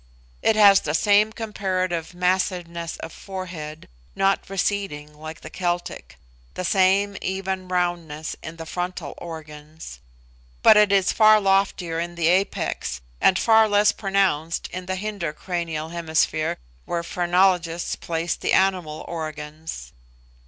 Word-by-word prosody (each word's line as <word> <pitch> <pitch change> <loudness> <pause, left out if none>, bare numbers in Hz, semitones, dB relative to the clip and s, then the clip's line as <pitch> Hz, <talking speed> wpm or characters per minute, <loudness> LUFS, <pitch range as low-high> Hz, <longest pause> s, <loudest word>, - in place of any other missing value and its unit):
It 225 - +3
has 200 -2 +7
the 150 0 -2
same 210 +4 +4
comparative 185 -6 -3
massiveness 180 -2 -1
of 160 - -7
forehead, 170 -5 -7 0.3
not 195 0 +1
receding 190 -6 -2
like 155 +1 -9
the 155 - -9
Celtic 175 -1 -3 0.4
the 185 - -3
same 195 +2 +3
even 190 0 -3
roundness 175 -4 -2
in 155 - -8
the 165 0 -8
frontal 180 -2 -4
organs; 155 - -9 0.6
but 220 - +8
it 210 -1 +5
is 195 -1 +3
far 215 -1 +6
loftier 195 -4 +1
in 175 +1 -4
the 165 -1 +2
apex, 180 - 0 0.2
and 185 - +5
far 220 0 +5
less 205 0 +4
pronounced 195 -6 0
in 180 0 -7
the 185 - -1
hinder 195 -5 -3
cranial 165 -2 -4
hemisphere 160 -2 0 0.3
where 170 -1 -2
phrenologists 175 -1 +1
place 165 0 -2
the - - -2
animal 180 -5 +1
organs. 155 - -6
175 Hz, 130 wpm, -23 LUFS, 160-195 Hz, 0.6 s, but